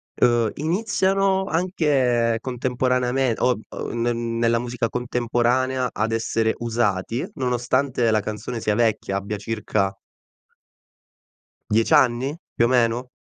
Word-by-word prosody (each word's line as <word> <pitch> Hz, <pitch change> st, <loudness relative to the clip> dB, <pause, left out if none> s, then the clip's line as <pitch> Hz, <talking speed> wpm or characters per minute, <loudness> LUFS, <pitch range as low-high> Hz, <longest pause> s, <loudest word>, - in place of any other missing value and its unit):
ehm, 120 Hz, -2 st, +3 dB
iniziano 190 Hz, +3 st, +1 dB
anche 135 Hz, -10 st, +1 dB
contemporaneame 125 Hz, 0 st, 0 dB
o 125 Hz, -2 st, +2 dB
o -, -, -6 dB
n 120 Hz, -, -2 dB
ne 120 Hz, +1 st, +1 dB
nella 115 Hz, 0 st, 0 dB
musica 120 Hz, -1 st, -2 dB
contemporanea 125 Hz, +1 st, 0 dB
ad 110 Hz, +1 st, -1 dB
essere 115 Hz, 0 st, 0 dB
usati 115 Hz, -1 st, -1 dB
nonostante 125 Hz, -1 st, 0 dB
la 110 Hz, -, +3 dB
canzone 110 Hz, +3 st, -5 dB
sia 105 Hz, -, 0 dB
vecchia, 110 Hz, -3 st, 0 dB
abbia 100 Hz, +1 st, -4 dB
circa 100 Hz, -2 st, -2 dB, 1.7 s
10 110 Hz, +1 st, +2 dB
anni? 130 Hz, +5 st, +3 dB, 0.2 s
Più 115 Hz, -, +2 dB
o 120 Hz, -, +1 dB
meno? 125 Hz, 0 st, +1 dB
120 Hz, 120 wpm, -23 LUFS, 115-130 Hz, 1.7 s, ehm